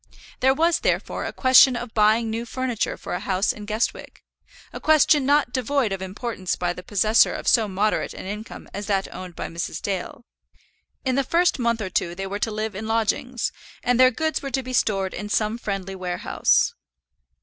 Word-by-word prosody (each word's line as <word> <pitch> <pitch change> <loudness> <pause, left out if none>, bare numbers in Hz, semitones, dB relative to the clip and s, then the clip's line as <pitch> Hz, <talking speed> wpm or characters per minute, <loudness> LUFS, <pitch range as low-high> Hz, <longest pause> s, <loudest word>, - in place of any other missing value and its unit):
There 265 +1 +3
was, 330 +3 +2
therefore, - - -1
a - - -3
question 260 0 +6
of 240 -1 -6
buying 220 +2 +3
new 225 +1 -2
furniture 245 -1 -2
for - - -6
a 180 - -1
house 195 0 0
in 210 0 -10
Guestwick, 215 +2 -3 0.5
a - - -6
question 305 -2 +4
not 285 -3 +3
devoid 255 -2 0
of 195 -1 -3
importance 190 0 -4
to 175 0 -1
the 180 - -9
possessor 215 +4 +3
of - - -6
so 225 -3 +4
moderate 205 +2 -1
an - - -8
income 210 +3 -7
as 200 +1 -5
that 195 -2 -1
owned 180 -2 -8
by - - -5
Mrs. 170 0 -4
Dale. 195 +4 -4 0.8
In 260 - +1
the 275 +2 +2
first 340 +2 +2
month 235 -2 0
or 190 -3 -4
two 170 0 -1
they 195 +2 -4
were 200 +1 -4
to 225 - 0
live 215 0 -3
in 210 +3 -6
lodgings, 225 +2 0 0.3
and 245 0 +2
their 255 0 +8
goods 315 +5 -2
were 275 - -4
to 265 0 -1
be 255 0 -6
stored 195 -5 +1
in 210 - -6
some 215 +2 0
friendly 195 -3 -4
warehouse. 185 - +1
220 Hz, 195 wpm, -23 LUFS, 195-255 Hz, 0.8 s, their